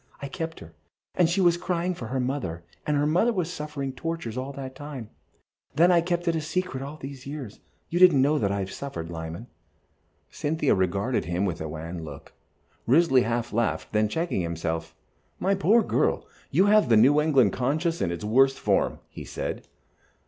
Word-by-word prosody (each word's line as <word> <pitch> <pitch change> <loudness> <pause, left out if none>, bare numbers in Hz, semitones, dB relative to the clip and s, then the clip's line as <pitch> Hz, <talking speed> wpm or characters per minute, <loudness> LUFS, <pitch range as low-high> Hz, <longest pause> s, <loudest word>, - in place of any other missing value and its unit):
I 140 - -5
kept 165 +2 -5
her, 80 0 -12 0.4
and 175 -2 +3
she 190 +3 +1
was 175 -1 +4
crying 180 0 -1
for 120 -9 -7
her 130 +3 -2
mother, 125 - -3 0.2
and 150 -1 +2
her 145 - +2
mother 175 +10 +3
was 180 -5 -2
suffering 140 -4 -4
tortures 150 -4 -4
all 130 +2 -4
that 135 -1 -7
time. 135 -5 -8 0.6
Then 170 +4 +5
I 170 -1 +5
kept 175 0 -2
it 165 -1 +1
secret 160 -3 -2
all 140 +3 -7
these 135 -2 -9
years. 140 -7 -7 0.3
You 175 - 0
didn't 180 -6 +7
know 145 +2 +3
what 105 -10 +1
I 100 0 -1
have 95 0 -5
suffered, 85 -12 -6
Lyman." 80 +5 -6 0.9
Cynthia 150 -1 0
regarded 100 +7 0
him 90 +3 -1
with 85 -5 -3
a 80 - -4
wan 80 +2 -6
look. 75 -3 -10 0.5
Risley 135 0 +5
half 120 0 -2
laughed, 120 +1 0
then 105 0 +2
checked 165 +7 -2
himself. 80 -4 -2 0.4
"My 195 +2 +2
poor 205 +4 +4
girl, - - 0 0.2
you 190 - +4
have 210 -8 +4
the 115 - +6
New 140 +7 +6
England 135 -10 +3
conscience 155 +6 0
in 90 - +1
its 85 +4 -5
worst 135 +5 +4
form," - - +1
he - - -9
said. - - -5
135 Hz, 185 wpm, -26 LUFS, 105-165 Hz, 0.9 s, didn't